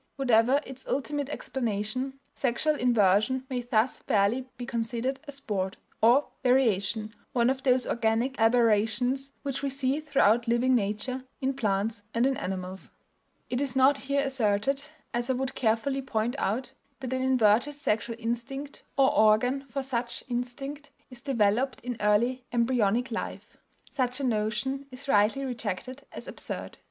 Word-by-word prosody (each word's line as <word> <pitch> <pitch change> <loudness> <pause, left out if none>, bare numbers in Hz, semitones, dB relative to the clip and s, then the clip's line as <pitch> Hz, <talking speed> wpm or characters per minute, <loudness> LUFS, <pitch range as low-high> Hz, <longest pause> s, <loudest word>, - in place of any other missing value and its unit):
Whatever 255 +1 +3
its 265 0 -10
ultimate 285 0 -2
explanation, 255 0 -3
sexual 275 +4 +1
inversion 240 0 +3
may 250 -1 -1
thus 240 0 +1
fairly 220 +5 +1
be 245 - -5
considered 235 +3 -2
a - - -5
"sport," 205 -9 -3 0.2
or 245 +6 +5
variation, 220 -4 +2 0.2
one 240 0 +3
of 265 0 -3
those 255 -1 +3
organic 235 +3 0
aberrations 230 +3 +2
which 275 -2 -3
we 280 - -1
see 270 +1 0
throughout 240 -6 +3
living 240 +2 +3
nature, 230 +4 -1 0.2
in 270 0 0
plants 215 -3 -1
and 235 +2 +3
in 270 0 +2
animals. 185 0 -5 0.6
It 250 +2 0
is 270 -2 -2
not 265 +2 +5
here 280 +1 0
asserted, 270 0 +1 0.3
as 240 +1 -1
I - - +3
would 265 +1 -2
carefully 250 +4 0
point 240 -1 -1
out, 240 +6 -1 0.3
that 260 -1 -4
an 260 - 0
inverted 255 +1 +3
sexual 230 -5 -1
instinct, 240 +5 -4 0.2
or 270 -1 +4
organ 245 +6 +4
for 270 +3 -3
such 240 -2 -3
instinct, 275 +4 -4 0.2
is 245 -1 -11
developed 250 0 +1
in 245 0 -4
early 235 +5 +2
embryonic 240 -1 +1
life; 230 - -4 0.5
such 255 -1 -1
a - - -3
notion 240 +4 -1
is 255 +1 -9
rightly 225 +3 +3
rejected 250 +2 -5
as - - -8
absurd. - - -6
245 Hz, 145 wpm, -28 LUFS, 220-270 Hz, 0.6 s, or